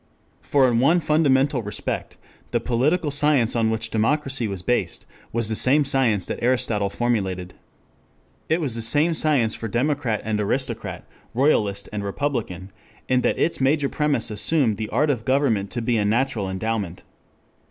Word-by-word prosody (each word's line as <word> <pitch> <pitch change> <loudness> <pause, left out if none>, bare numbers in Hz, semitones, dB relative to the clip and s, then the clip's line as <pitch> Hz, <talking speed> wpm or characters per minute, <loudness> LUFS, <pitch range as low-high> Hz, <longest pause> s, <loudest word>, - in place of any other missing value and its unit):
For 135 -2 +3
in 120 -2 +2
one 160 +8 +4
fundamental 145 -4 +2
respect 105 -1 -4 0.3
the - - 0
political 145 +6 0
science 145 -5 +2
on 115 -1 +2
which 110 0 -2
democracy 135 +2 0
was 95 -3 -5
based 100 -8 -1 0.3
was 115 -1 -1
the 110 - -2
same 140 +6 +3
science 120 -8 +1
that - - -5
Aristotle 115 -5 +1
formulated. 95 -6 -2 1.0
It 160 - +2
was 145 -8 -2
the 115 - -3
same 145 +9 +3
science 140 -8 +2
for 115 - -5
democrat 125 -1 -1
and 105 -1 -1
aristocrat, 115 +1 -2 0.3
royalist 105 -7 +1
and 105 -1 -3
republican, 100 -5 -3 0.4
in 125 0 +2
that - - 0
its 165 - 0
major 140 +1 +2
premise 150 -7 0
assumed 115 0 +2
the 110 0 -4
art 150 0 +2
of 120 -5 -3
government 130 -7 +1
to 120 -1 -3
be 120 0 +1
a 105 - +1
natural 110 -1 0
endowment. 95 -2 -3
120 Hz, 160 wpm, -23 LUFS, 105-140 Hz, 1.0 s, one